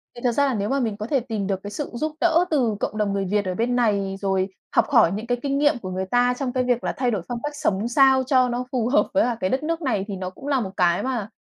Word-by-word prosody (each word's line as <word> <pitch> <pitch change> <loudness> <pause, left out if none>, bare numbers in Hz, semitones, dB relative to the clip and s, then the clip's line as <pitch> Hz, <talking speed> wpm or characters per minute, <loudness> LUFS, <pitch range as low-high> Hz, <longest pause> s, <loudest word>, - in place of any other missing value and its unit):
Thì 240 - -10
thật 245 - +3
ra 285 +4 +2
là 270 - 0
nếu 205 -2 -2
mà 275 - +1
mình 225 -5 -2
có 210 - -5
thể 275 +1 +2
tìm 220 -5 -4
được 195 -2 -1
cái 205 - -6
sự 290 +7 -4
giúp 310 +6 -2
đỡ 340 0 +4
từ 245 -8 +2
cộng 215 - -3
đồng 210 -2 0
người 195 -1 -1
Việt 205 +2 0
ở 185 -1 -2
bên 240 +4 0
này, 200 -5 +1
rồi 190 -1 0 0.3
học - - +5
hỏi 230 - +5
những 215 +4 -4
cái 245 0 0
kinh 275 -1 0
nghiệm 290 -1 +3
của 185 - -6
người 185 +1 -2
ta 245 +5 +2
trong 260 -3 -2
cái 255 - +1
việc 245 -1 0
là - - -1
thay 250 -2 +1
đổi 205 -5 -1
phong 240 -1 -4
cách 295 0 -4
sống 225 -8 0
sao 265 +1 +4
cho 255 -1 +3
nó 245 +1 -2
phù 240 -3 0
hợp 285 - +3
với 295 - +4
cả 240 -2 -1
cái 185 - 0
đất 265 +6 -1
nước 330 +2 -2
này, 225 - -1
thì 200 - -4
nó 185 -1 -4
cũng 230 +9 -11
là 280 -2 +2
một 195 -6 -4
cái 175 -1 +2
mà, 240 -6 -2
240 Hz, 315 wpm, -23 LUFS, 200-265 Hz, 0.3 s, học